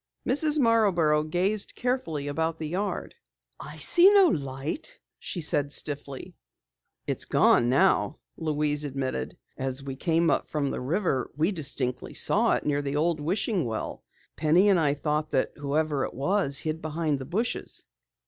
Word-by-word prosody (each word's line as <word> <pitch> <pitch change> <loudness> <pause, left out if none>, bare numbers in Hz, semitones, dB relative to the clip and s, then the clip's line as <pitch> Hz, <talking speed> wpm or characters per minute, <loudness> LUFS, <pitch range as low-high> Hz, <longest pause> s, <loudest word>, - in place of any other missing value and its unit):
Mrs. 300 +4 +3
Marborough 200 - +3
gazed 185 +7 0
carefully 245 - -2
about 160 +3 -2
the 160 - -5
yard. 195 +4 -3 0.5
"I - - -9
see 360 +3 +6
no 395 -3 +6
light," 145 - -4 0.2
she 175 - -4
said 145 -2 +1
stiffly. 140 -2 -4 0.7
"It's - - -2
gone 120 - +3
now," 130 -1 +2 0.2
Louise 150 -2 -1
admitted. 130 - -4 0.2
"As 135 +1 -3
we 135 -1 -6
came 165 +3 +1
up - - 0
from 145 -3 -1
the - - -4
river, 145 -1 -1
we 160 +6 +2
distinctly 135 -7 -2
saw - - +3
it - - -2
near 145 -1 0
the 140 0 -3
old 160 +1 +1
wishing 185 +4 -1
well. 115 -3 -5 0.3
Penny 165 +6 +3
and 190 -3 +4
I 145 -3 +2
thought 150 +1 -2
that - - 0
whoever 145 0 -1
it - - -8
was 140 0 0
hid 155 +2 -4
behind 155 -2 -2
the 130 - -6
bushes!" 210 - -3
155 Hz, 155 wpm, -26 LUFS, 140-185 Hz, 0.7 s, see